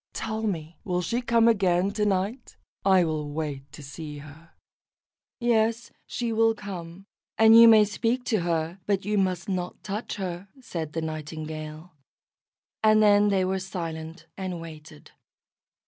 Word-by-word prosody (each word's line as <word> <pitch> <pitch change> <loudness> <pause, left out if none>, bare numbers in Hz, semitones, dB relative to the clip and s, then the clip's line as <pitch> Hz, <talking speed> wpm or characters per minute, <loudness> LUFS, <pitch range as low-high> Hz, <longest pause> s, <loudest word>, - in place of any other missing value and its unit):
Tell 220 0 -3
me, 165 -7 -4
will 180 -1 -1
she 235 +8 -1
come 235 -1 +3
again 195 -4 +2
to 210 0 0
night? 200 +6 -2 0.3
I 190 -2 +5
will 155 -2 -2
wait 145 -3 -5
to 150 - -10
see 150 +2 -8
her." 155 +3 -13 0.9
"Yes, 230 -1 +1 0.2
she 235 -2 -2
will 225 0 +3
come, 190 -3 -8 0.3
and 225 0 +7
you 230 0 +10
may 220 -2 +7
speak 230 +4 -1
to 220 -4 +1
her, 170 +1 -2
but 195 -2 0
you 210 0 +1
must 185 -2 -1
not 180 -2 -4
touch 210 +3 -4
her," 185 -1 -5
said 165 - -6
the 165 - -2
Nightingale; 155 +1 -6 0.9
and 215 0 +5
then 205 0 +5
they 190 -2 +2
were 190 +1 -1
silent 165 -4 -6
and 185 -3 -4
waited. 155 -2 -12
185 Hz, 150 wpm, -26 LUFS, 160-215 Hz, 0.9 s, you